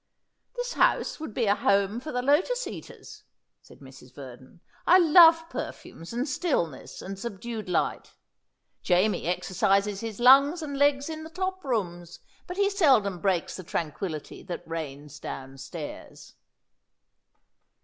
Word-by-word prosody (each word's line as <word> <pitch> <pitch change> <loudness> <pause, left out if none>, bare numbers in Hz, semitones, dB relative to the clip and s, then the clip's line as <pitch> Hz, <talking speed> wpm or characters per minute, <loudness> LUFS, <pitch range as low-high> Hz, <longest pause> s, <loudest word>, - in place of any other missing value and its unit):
"This - - -3
house - - +1
would 315 - -6
be 230 +2 -1
a 200 - +4
home 200 +1 +1
for 305 +5 -7
the 250 0 -2
lotus 370 - +2
eaters," - - -10 0.4
said - - -18
Mrs. 130 -2 -14
Verdon. 130 +2 -12 0.3
"I 360 - +8
love 330 -1 +7
perfumes 165 - -8
and 245 +4 -2
stillness 255 - -2
and 195 0 -7
subdued 220 -1 -6
light. - - -1 0.7
Jamie 185 +4 +1
exercises 195 +3 +1
his 225 -1 -6
lungs 275 +7 +6
and 285 -2 -5
legs 285 0 +2
in 315 -1 -6
the 320 - -9
top 375 +2 -4
rooms, 175 -9 -3 0.3
but 360 +1 -6
he 400 0 +3
seldom 265 - +3
breaks 185 -2 0
the 185 - -8
tranquillity 160 -1 -5
that 175 -3 -7
reigns 150 -3 -7
downstairs." 135 0 -8
215 Hz, 135 wpm, -27 LUFS, -, 0.7 s, I